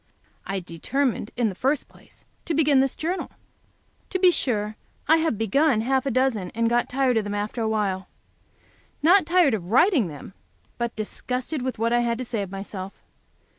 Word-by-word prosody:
I 195 0 -2
determined, 210 - -2
in 235 -3 +2
the - - -5
first 270 +9 0
place, - - -17 0.2
to 330 - -1
begin 295 -3 +4
this 270 0 +1
Journal. 350 +4 -3 0.8
To 375 - -1
be 365 -1 +5
sure, 215 -9 -1 0.3
I 320 - +6
have 320 -8 0
begun 225 +3 +2
half 265 +3 0
a - - +2
dozen, 245 -7 +1
and 230 0 +1
got 240 0 +1
tired 255 -2 +1
of 220 - +1
them 205 0 -4
after 210 +3 -3
a 220 - 0
while. 195 -4 -1 1.0
Not 350 +1 +5
tired 345 -6 +4
of 180 -5 -3
writing 260 - +4
them, 150 +4 -10 0.5
but 235 0 -2
disgusted 250 +6 -4
with 255 0 -3
what 230 +2 +1
I 240 - +4
had 235 -1 0
to 255 - -4
say 230 -3 -2
of 195 - -5
myself. 195 0 -6
240 Hz, 185 wpm, -24 LUFS, 210-275 Hz, 1.0 s, I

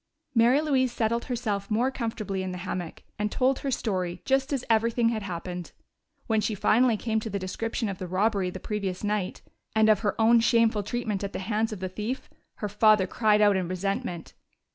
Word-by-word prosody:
Mary 245 +4 +5
Louise 265 -5 +2
settled 235 0 0
herself 210 -5 -2
more 235 +5 +1
comfortably 215 -6 -3
in 185 0 -3
the 180 - -5
hammock, 175 -3 -5 0.2
and 210 0 -1
told 260 +1 +2
her 275 - -3
story, 185 -8 -2
just 270 +1 +1
as 270 -3 -1
everything 230 +1 +2
had 225 -2 -2
happened. 180 -2 -6 0.5
When 220 -1 +1
she 215 - -1
finally 235 +3 +3
came 220 0 -1
to 220 - -5
the 200 - -2
description 225 +5 -3
of 195 -2 -5
the 185 - -4
robbery 195 +1 +1
the 185 - -7
previous 195 -2 -3
night, 205 -3 -2 0.3
and 220 0 +5
of 215 -2 +5
her 205 +1 -1
own 230 +1 +6
shameful 230 -2 +3
treatment 215 -2 -3
at 200 - -4
the - - -3
hands 215 +3 -1
of 205 -4 -6
the 185 - -1
thief, 215 +7 -5 0.2
her 210 - -3
father 210 -1 +4
cried 210 +2 +2
out 205 -1 +5
in 185 -2 -1
resentment. 185 -2 -3
215 Hz, 200 wpm, -27 LUFS, 190-230 Hz, 0.5 s, own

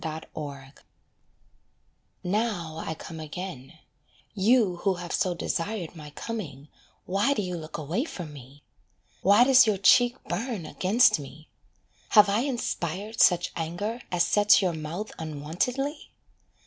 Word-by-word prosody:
RETURN 150 -3 -7 1.5
Now 180 -5 -1
I - - -5
am 160 - -3
come 160 +1 -9
again, 160 -2 -7 0.6
you 210 -2 +3
who 190 +1 0
have 175 -1 -7
so 180 -2 0
desired 175 +1 -3
My 150 -2 -9
coming, 150 - -7 0.4
why 200 +10 +1
do 210 - -1
you 180 -1 -4
look 155 -2 -7
away 165 - -2
from 170 - -7
me? 140 +1 -14 0.6
Why 205 +5 +6
does 260 -1 +6
your 210 -2 +2
cheek 245 +6 +5
burn 225 -7 -4
against 195 +3 +3
me 145 +2 -11 0.7
have 210 -1 +8
I 205 +2 +2
inspired 220 - -3
Such 175 -1 +4
anger 175 +9 -3
as 175 -1 +3
sets 205 0 +5
your 185 -3 0
mouth 160 +7 -5
unwontedly? 175 - -3
180 Hz, 135 wpm, -27 LUFS, 155-215 Hz, 1.5 s, have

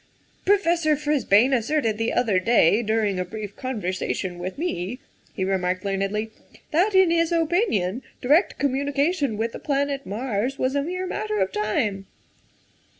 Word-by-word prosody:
" - - -37
Professor 340 -6 +3
Frisbane 275 -5 +3
asserted 230 -3 0
the 225 - 0
other 220 -6 +2
day, 215 0 +4
during 215 -4 0
a - - 0
brief 205 +2 -7
conversation 185 -6 -3
with 185 +1 -5
me," 245 - -3 0.4
he 190 - -1
remarked 185 0 -1
learnedly, 200 +3 -1 0.2
" - - -24
that, 380 +6 +2
in 380 -3 +5
his 335 0 +2
opinion, 325 - +1 0.2
direct 300 +9 +3
communication 280 - 0
with 230 +2 -1
the - - -8
planet 280 -1 -1
Mars 235 +3 -2
was 260 0 0
a 280 - +1
mere 365 +5 -3
matter 215 -11 -3
of 190 0 +1
time. 210 -2 -1
235 Hz, 150 wpm, -24 LUFS, 200-295 Hz, 0.4 s, in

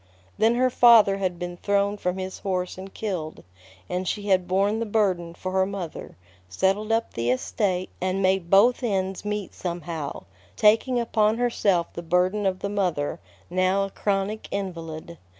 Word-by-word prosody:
Then 225 +2 +4
her 255 +1 +2
father 230 -5 +6
had 185 -3 -2
been 175 0 -5
thrown 200 +1 +1
from 180 -2 -2
his 190 0 -5
horse 185 -2 -2
and 190 +1 -9
killed; 180 -8 -5 0.4
and 180 - -3
she 205 -1 -3
had 185 -2 +3
borne 200 +4 +1
the 230 - -1
burden 185 -6 0
for 185 - -5
her 190 0 +2
mother, 185 - -7 0.3
settled 195 - 0
up 225 0 0
the 115 +1 -1
estate, 185 - -1
and 185 +1 0
made 190 -2 +1
both 220 +8 +5
ends 190 -5 -1
meet 210 -2 -3
somehow, 170 - -5 0.3
taking 225 - +3
upon 220 -2 +2
herself 205 -8 +1
the 170 - -5
burden 180 +4 +1
of 185 -1 -2
the - - -1
mother, 175 -6 -1 0.3
now 185 +2 +1
a 195 - -8
chronic 200 +2 -2
invalid. 170 -4 -5
190 Hz, 165 wpm, -25 LUFS, 180-210 Hz, 0.4 s, father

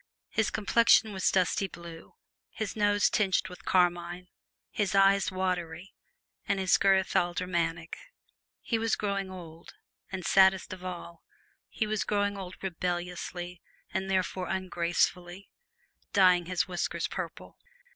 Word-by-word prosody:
His 220 -2 +1
complexion 220 0 +4
was 190 - +1
dusty 190 +1 +1
blue, 170 - -11 0.3
his 215 -3 -5
nose 205 -1 +3
tinged 195 -3 +1
with 180 - -12
carmine, 175 0 +1 0.4
his 200 -1 -1
eyes 195 0 +4
watery, 185 -1 -3 0.5
and 200 - +1
his 190 -1 +3
girth 190 -1 +3
aldermanic. 175 -2 -1 0.7
He 230 - -1
was 225 0 +1
growing 200 -2 -2
old, 170 -3 -11 0.4
and, 185 -2 -5
saddest 190 -1 +4
of 185 -1 -10
all, 175 -2 -7 0.5
he 220 - -1
was 215 -1 -1
growing 205 -1 0
old 185 -2 -7
rebelliously 180 -1 -4 0.3
and 190 0 -2
therefore 185 -1 -1
ungracefully 180 0 -1 0.6
dyeing 180 -3 +5
his 180 -1 0
whiskers 180 -1 -2
purple. - - -7
185 Hz, 125 wpm, -29 LUFS, 175-195 Hz, 0.7 s, dyeing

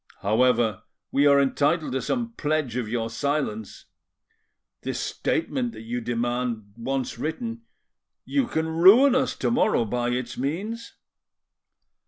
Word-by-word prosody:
However, 115 -1 +2 0.3
we 140 +1 +4
are 140 0 +6
entitle 145 +4 +1
to 130 0 -1
some 235 - -2
pledge 150 - -1
of 120 -4 -2
your 115 -1 -1
silence. 115 -3 -3 1.0
This - - -3
statement 240 +8 -1
that - - -10
you 120 +2 -3
demand, 120 -3 -2
once 130 +2 -3
written,—you 230 - -5
can 160 -8 -1
ruin 195 +12 +6
us 260 0 +1
tomorrow 220 - +2
by 120 +2 -1
its 125 0 -3
means." 200 - -4
140 Hz, 120 wpm, -25 LUFS, 120-190 Hz, 1.0 s, are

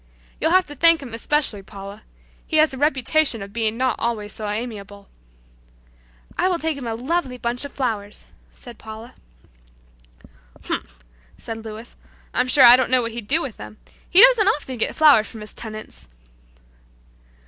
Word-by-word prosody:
You'll 320 - +1
have 370 +2 +3
to 295 - -10
thank 330 +3 +4
him 245 -4 -10
especially, 235 -3 -1
Paula. 200 +2 -11 0.5
He 315 - 0
has 310 -2 +3
a - - -7
reputation 285 -4 +1
of 200 0 -12
being 225 -1 -2
not 255 -2 0
always 215 -3 -2
so 215 -1 -2
amiable." 205 -2 -7 1.3
"I 365 - +2
will 365 -2 0
take 320 -2 -2
him 265 -4 -7
a 225 - -3
lovely 260 +1 -3
bunch 245 +2 -4
of 285 - -8
flowers," 215 -6 -4 0.3
said 240 -4 -14
Paula. 220 +1 -11 1.5
"Humph!" - - -6 0.3
said 225 -1 -8
Louis, 220 +1 -10 0.4
"I'm 250 - 0
sure 265 +1 +5
I 240 0 +10
don't 260 - 0
know 255 -1 +2
what 230 - -4
he'd 230 -2 -8
do 320 +7 +3
with 245 - -7
them. 105 0 -11 0.3
He 380 +5 +8
doesn't - - +6
often 265 - -1
get - - 0
flowers 290 -9 +5
from 220 - -11
his 210 - -10
tenants." 215 - -8
240 Hz, 170 wpm, -21 LUFS, 215-290 Hz, 1.5 s, I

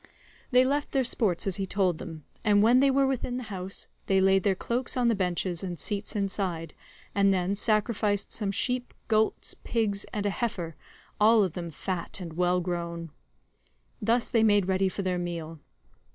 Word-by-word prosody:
They 255 -1 +5
left 285 +2 -1
their 270 -1 +3
sports 215 -7 +1
as 195 -3 +1
he 195 -1 -2
told 185 -4 +1
them, 160 -4 -8 0.2
and 205 -2 +4
when 240 +3 +6
they 275 +1 +5
were 270 0 +3
within 255 -2 -1
the 255 - -4
house, 190 +1 -5 0.2
they 190 -1 +3
laid 190 0 +4
their 195 0 +2
cloaks 245 +6 -2
on 245 -1 +3
the - - +3
benches 180 -2 -1
and 180 -2 -4
seats 205 +3 -3
inside, 190 -5 -2 0.4
and 200 -1 +4
then 185 0 +1
sacrificed 210 -1 +1
some 205 -3 -1
sheep, 250 +4 -1
goats, 220 0 +1
pigs, 210 -4 0
and 205 -1 -3
a 205 - +2
heifer, 185 - -3 0.4
all 215 0 +6
of 185 -5 -1
them 170 -2 -5
fat 180 +4 -4
and 170 -3 -7
well 180 +1 +2
grown.141 170 -1 -4 0.9
Thus 230 +3 +1
they 230 - +4
made 205 -3 +4
ready 190 0 +2
for 195 - -4
their 180 -1 0
meal. 165 -2 -5
195 Hz, 180 wpm, -28 LUFS, 180-225 Hz, 0.9 s, when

